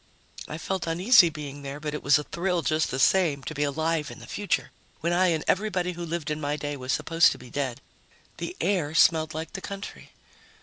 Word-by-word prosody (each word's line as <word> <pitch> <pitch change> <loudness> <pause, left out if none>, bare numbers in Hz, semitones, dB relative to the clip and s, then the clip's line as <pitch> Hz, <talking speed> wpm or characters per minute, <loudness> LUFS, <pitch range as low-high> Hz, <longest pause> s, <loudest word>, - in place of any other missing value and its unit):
I 155 - -5
felt 185 +2 -3
uneasy 180 +3 +6
being 145 -2 -7
there, 140 +1 -6
but 150 0 -4
it 150 - -4
was 140 +2 +5
a 150 - -3
thrill 175 +1 -1
just 155 +2 +1
the 130 - -3
same, 150 -2 +3
to - - -5
be 145 - -4
alive 155 +1 0
in - - -9
the - - -11
future 205 -1 -2 0.3
when 170 +2 0
I 185 +1 +4
and 160 -3 +1
everybody 185 -3 +1
who 175 0 -6
lived 165 -2 -3
in 150 0 -3
my 145 0 -1
day 145 0 -4
was 130 -1 -4
supposed 165 +3 +4
to - - -11
be 125 -1 -13
dead. 135 -3 -3 0.6
The 360 - -5
air 165 -6 0
smelled 160 -2 +4
like 160 +1 -5
the 190 - -5
country. 200 +1 -8
160 Hz, 220 wpm, -26 LUFS, 145-175 Hz, 0.6 s, uneasy